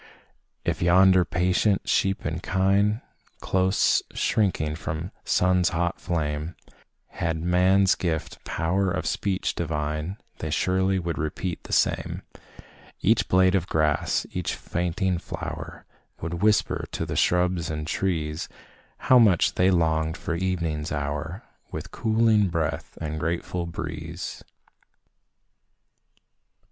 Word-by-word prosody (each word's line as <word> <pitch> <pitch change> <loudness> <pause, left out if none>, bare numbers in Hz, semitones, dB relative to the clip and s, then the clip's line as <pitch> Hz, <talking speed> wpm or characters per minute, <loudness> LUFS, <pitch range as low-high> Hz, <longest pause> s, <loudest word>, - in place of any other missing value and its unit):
If - - -1
yonder 95 +2 +6
patient 90 +3 +1
sheep 95 0 +1
and 80 +1 -2
kine, 100 +5 +2 0.4
Close 95 +1 +2
shrinking 80 -8 +1
from 80 -1 -4
the 90 - -7 0.2
sun's 90 -1 +3
hot 85 0 -1
flame, 75 0 -2 0.5
Had 80 -1 -2
man's 95 +2 +4
gift 80 -2 -3
"power 95 +4 0
of 90 0 -2
speech 95 -2 -1
divine," 75 +2 -3 0.2
They 80 - -3
surely 95 +4 +1
would 85 -2 -3
repeat 80 +3 -3
the - - -10
same - - +1 0.8
Each 105 0 +3
blade 95 0 +4
of 95 -2 +1
grass, 75 -2 +1
each 90 -2 -2
fainting 90 +1 -1
flower, - - -7 0.3
Would 85 +1 -4
whisper 105 0 +2
to - - -2
the - - -4
shrubs 90 -2 +2
and 75 -1 -3
trees, 80 -3 -2 0.5
How 130 - +6
much 100 -8 +4
they 90 +1 +3
longed 80 -2 +1
for 90 - -3
evening's 85 -4 -2
hour, 75 +5 -3 0.3
With - - -6
cooling 110 -2 +3
breath 85 -3 -3
and 80 -1 -4
grateful 85 +2 -2
breeze. 85 +1 -6
90 Hz, 120 wpm, -25 LUFS, 80-95 Hz, 0.8 s, yonder